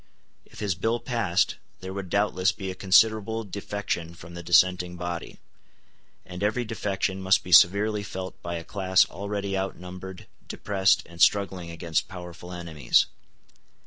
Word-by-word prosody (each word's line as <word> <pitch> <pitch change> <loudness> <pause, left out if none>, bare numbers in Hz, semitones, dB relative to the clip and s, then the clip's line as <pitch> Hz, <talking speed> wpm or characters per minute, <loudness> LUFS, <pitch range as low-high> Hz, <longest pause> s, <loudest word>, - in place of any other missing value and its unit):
If - - -13
his 100 -3 0
bill 115 +7 -1
passed, 115 -9 0 0.2
there 95 0 -6
would 95 -2 -5
doubtless 100 0 +2
be 95 -4 -5
a - - -5
considerable 110 +4 +3
defection 100 -4 -4
from 85 +1 -12
the 85 - -7
dissenting 90 +1 +3
body; 85 -1 -5 0.9
and 90 +1 -8
every 110 +4 0
defection 100 -3 -2
must 95 0 +3
be 90 - -8
severely 105 +5 +6
felt 95 -2 -7
by 85 0 -4
a 85 - -5
class 95 -1 +3
already 100 0 -3
outnumbered, 95 -1 -6 0.2
depressed, 100 -2 +1
and 85 0 -11
struggling 95 -4 +3
against 85 -1 -2
powerful 90 -1 -9
enemies. 85 -7 +1
95 Hz, 145 wpm, -26 LUFS, 90-100 Hz, 0.9 s, severely